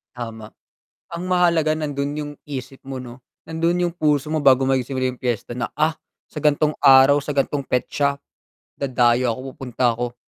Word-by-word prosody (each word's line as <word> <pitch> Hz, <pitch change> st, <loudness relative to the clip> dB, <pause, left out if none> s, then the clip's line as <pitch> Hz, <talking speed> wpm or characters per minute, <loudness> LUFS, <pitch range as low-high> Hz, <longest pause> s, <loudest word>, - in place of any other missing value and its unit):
Tama, 115 Hz, -3 st, -7 dB, 0.7 s
ang 170 Hz, +1 st, -4 dB
mahalaga 170 Hz, -4 st, +2 dB
nandun 145 Hz, -2 st, -2 dB
'yung 145 Hz, -1 st, -4 dB, 0.2 s
isip 135 Hz, -1 st, -7 dB
mo, 135 Hz, -, -4 dB
'no, 125 Hz, 0 st, -10 dB, 0.2 s
nandun 170 Hz, +2 st, 0 dB
yung 170 Hz, -, -3 dB
puso 150 Hz, -3 st, 0 dB
mo 155 Hz, -, 0 dB
bago 135 Hz, -1 st, +5 dB
magsimula 130 Hz, -1 st, 0 dB
yung -, -, -18 dB
piyesta 120 Hz, -1 st, -2 dB
na, 125 Hz, 0 st, -3 dB
ah, 155 Hz, +1 st, +2 dB, 0.3 s
sa 150 Hz, -, -8 dB
gan'tong 150 Hz, 0 st, +2 dB
araw, 135 Hz, +1 st, +7 dB
sa 140 Hz, 0 st, -5 dB
gan'tong 140 Hz, +1 st, +1 dB
petsa, 140 Hz, +2 st, -1 dB, 0.6 s
dadayo 125 Hz, -3 st, +2 dB
ako, -, -, -11 dB
pupunta 125 Hz, -2 st, -1 dB
ako, 120 Hz, 0 st, -3 dB
140 Hz, 165 wpm, -21 LUFS, 125-150 Hz, 0.7 s, araw